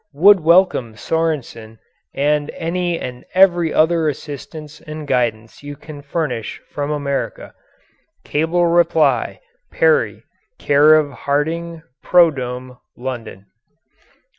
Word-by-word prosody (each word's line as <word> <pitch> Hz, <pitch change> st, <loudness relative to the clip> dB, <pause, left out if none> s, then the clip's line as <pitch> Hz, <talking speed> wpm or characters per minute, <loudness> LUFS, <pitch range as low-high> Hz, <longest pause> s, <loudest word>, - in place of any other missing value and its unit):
Would 195 Hz, +6 st, +6 dB
welcome 165 Hz, -, +2 dB
Sorensen 130 Hz, -8 st, -3 dB, 0.3 s
and 145 Hz, +1 st, 0 dB
any 175 Hz, +1 st, -2 dB
and 125 Hz, -1 st, -7 dB
every 175 Hz, -4 st, +4 dB
other 160 Hz, 0 st, +2 dB
assistance 150 Hz, +1 st, -8 dB
and 155 Hz, 0 st, -8 dB
guidance 115 Hz, -4 st, -2 dB
you 145 Hz, 0 st, -8 dB
can 150 Hz, 0 st, -11 dB
furnish 140 Hz, -6 st, -4 dB
from 145 Hz, 0 st, -3 dB
America. 140 Hz, -2 st, -3 dB, 0.7 s
Cable 165 Hz, +4 st, 0 dB
reply, 160 Hz, -6 st, +2 dB, 0.3 s
Perry, -, -, +1 dB, 0.3 s
Care 145 Hz, +2 st, +5 dB
of 150 Hz, -2 st, +1 dB
Harding 160 Hz, +5 st, -3 dB, 0.2 s
"Prodome," 130 Hz, -7 st, +1 dB, 0.2 s
London. 120 Hz, -6 st, -7 dB
150 Hz, 100 wpm, -19 LUFS, 130-165 Hz, 0.7 s, Would